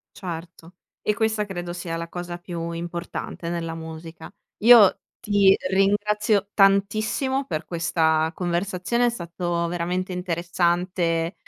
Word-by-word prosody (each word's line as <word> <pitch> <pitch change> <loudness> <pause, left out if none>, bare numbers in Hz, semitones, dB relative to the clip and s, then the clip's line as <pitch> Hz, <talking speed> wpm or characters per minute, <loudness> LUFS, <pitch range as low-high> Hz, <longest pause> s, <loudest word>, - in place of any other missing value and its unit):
Certo, 170 -1 -8 0.3
e 210 - 0
questa 220 -1 +1
credo 175 -3 -5
sia 170 -1 -4
la 170 0 -5
cosa 175 0 -6
più 170 -1 -5
importante 170 0 -5
nella 170 -1 -3
musica. 160 0 -9 0.3
Io 225 -3 +7 0.2
ti 205 -3 +4
ringrazio 205 +1 +2
tantissimo 210 +7 +2
per 155 - -3
questa 160 -2 +1
conversazione, 185 +6 0
è - - +3
stato 170 -4 -3
veramente 175 +2 -2
interessante, 175 -1 0
175 Hz, 115 wpm, -24 LUFS, 170-200 Hz, 0.3 s, Io